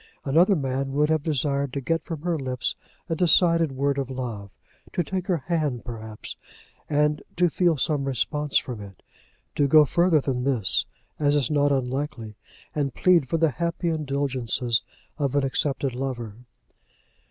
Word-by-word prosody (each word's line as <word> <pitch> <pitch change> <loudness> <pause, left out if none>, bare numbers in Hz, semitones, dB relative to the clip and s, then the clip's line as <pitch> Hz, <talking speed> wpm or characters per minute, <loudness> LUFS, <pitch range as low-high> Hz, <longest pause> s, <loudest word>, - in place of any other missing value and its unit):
Another 170 +8 +4
man 135 -2 -2
would 150 +2 +2
have 160 -1 +2
desired 140 -2 0
to 140 - -1
get 165 +4 -1
from 160 -3 -6
her 175 -1 0
lips 130 -2 -2 0.3
a 165 - -1
decided 165 -1 +4
word 140 +1 0
of 135 -2 -3
love, 120 -6 -5 0.4
to 175 - +1
take 185 +3 -4
her 180 -3 +2
hand, 155 -8 -1
perhaps, 110 -3 -7 0.5
and 150 0 +2 0.2
to 175 -1 +3
feel 175 -2 +2
some 145 0 0
response 145 +2 0
from 120 -5 -3
it, 100 -2 -12 0.5
to 145 - +2
go 150 +2 +7
further 170 +1 +3
than 130 -3 -2
this, 125 -8 +2 0.3
as 145 -1 +3
is 145 -1 +1
not 145 -1 +3
unlikely, 130 -4 -2 0.4
and 140 -4 -2
plead 170 -8 +3
for 165 - +1
the 160 -2 +3
happy 170 +3 -2
indulgences 135 -6 -1 0.4
of 140 -2 0
an 145 - +3
accepted 135 0 -1
lover. 120 -4 -4
140 Hz, 160 wpm, -25 LUFS, 130-160 Hz, 0.5 s, go